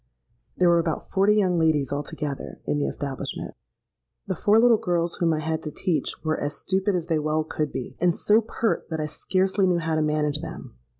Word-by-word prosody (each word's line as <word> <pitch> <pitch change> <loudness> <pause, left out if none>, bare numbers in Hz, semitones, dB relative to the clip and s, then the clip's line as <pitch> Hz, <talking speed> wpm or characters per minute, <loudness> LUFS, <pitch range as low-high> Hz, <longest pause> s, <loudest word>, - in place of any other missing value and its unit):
There 180 - +4
were 170 0 +5
about 165 -2 -3
forty 200 +2 +4
young 185 -5 +2
ladies 155 -5 +2
altogether 145 0 -4
in 145 - 0
the 145 - 0
establishment. 140 -2 -5 0.7
"The 190 - -1
four 205 +5 +3
little 230 -2 +5
girls 170 -1 -1
whom 170 -2 +2
I 155 -1 0
had 160 +1 -2
to 150 - -5
teach, 170 +2 -1
were 155 -1 -1
as 145 0 -1
stupid 190 +6 0
as 175 -2 -1
they 165 -2 0
well 155 +1 0
could 155 -1 -3
be, 125 - -5
and 175 -1 +2
so 215 +2 +4
pert 225 0 -2
that 160 -2 -3
I 155 - -1
scarcely 190 +5 0
knew 180 -1 +2
how 165 -1 -1
to 155 - +1
manage 150 -1 0
them. - - -8
165 Hz, 205 wpm, -25 LUFS, 150-185 Hz, 0.7 s, were